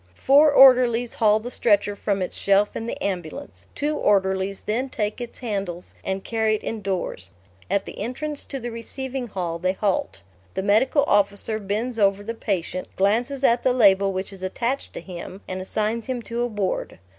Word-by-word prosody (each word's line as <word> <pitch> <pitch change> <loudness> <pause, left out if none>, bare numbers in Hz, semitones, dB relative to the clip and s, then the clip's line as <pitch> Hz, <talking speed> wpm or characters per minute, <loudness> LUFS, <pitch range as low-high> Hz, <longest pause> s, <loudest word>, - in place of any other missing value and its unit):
Four 290 - +5
orderlies 250 -3 +6
haul 215 -1 +3
the 240 +3 -7
stretcher 205 -3 +2
from 200 -1 -1
its 180 - -5
shelf 200 +1 +2
in 225 - -4
the - - -4
ambulance; 190 - -5
two 295 +1 -1
orderlies 190 -3 +1
then 245 +5 -2
take 210 0 -3
its 240 - -6
handles 195 -7 -4
and 190 0 -3
carry 220 -1 +1
it - - -6
indoors. 190 - -3 0.4
At 200 +1 +1
the - - -9
entrance 280 +7 -3
to 275 - -5
the 240 -1 -5
receiving 255 +2 -4
hall 175 -5 -3
they 185 +2 +1
halt. 195 - -1 0.3
The 190 - -1
Medical 225 +8 +3
Officer 205 0 +1
bends 220 +4 -3
over 200 0 +3
the 230 +2 -4
patient, 185 -5 -3
glances 240 +8 +1
at 240 -2 +4
the 255 - +2
label 200 -5 +5
which 190 +1 -4
is 190 - -10
attached 235 +8 -2
to - - -6
him, 185 +1 -8
and 185 0 -4
assigns 215 +4 -2
him 250 -2 -3
to 235 +1 -3
a 240 - +1
ward. 205 -5 -3
210 Hz, 180 wpm, -24 LUFS, 195-240 Hz, 0.4 s, orderlies